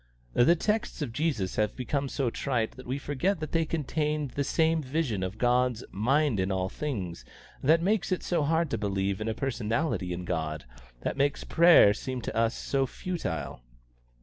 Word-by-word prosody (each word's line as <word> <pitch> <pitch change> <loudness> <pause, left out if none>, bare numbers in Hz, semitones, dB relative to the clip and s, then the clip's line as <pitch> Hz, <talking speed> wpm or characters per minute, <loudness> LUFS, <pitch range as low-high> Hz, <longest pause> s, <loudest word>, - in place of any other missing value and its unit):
The 145 +8 +5
texts 210 -1 -1
of 120 -5 -5
Jesus 125 - -1
have 105 -1 +1
become 140 +2 -2
so 130 -4 -1
trite 120 -5 -1
that 130 - -12
we 130 +2 -1
forget 145 +7 -1
that 155 -2 -5
they 165 -1 +2
contain 150 -2 -1
the 140 - 0
same 160 +2 +2
vision 130 - -1
of 95 +3 -3
'God's 125 0 +2
mind 135 +2 +2
in 95 +1 0
all 95 0 -1
things' 100 - -4 0.4
that 160 +4 +4
makes 200 0 +1
it 185 - 0
so 175 - 0
hard 160 +1 +1
to 115 - -1
believe 100 -1 -1
in 110 - -2
a 110 - -1
personality 115 - -1
in 90 +1 -4
God, 80 -4 -3 0.4
that - - -2
makes 140 +1 +1
prayer 170 -11 +6
seem 130 +4 -4
to - - -4
us 115 0 +2
so 135 -1 0
futile." 125 - -4
130 Hz, 180 wpm, -28 LUFS, 105-155 Hz, 0.4 s, prayer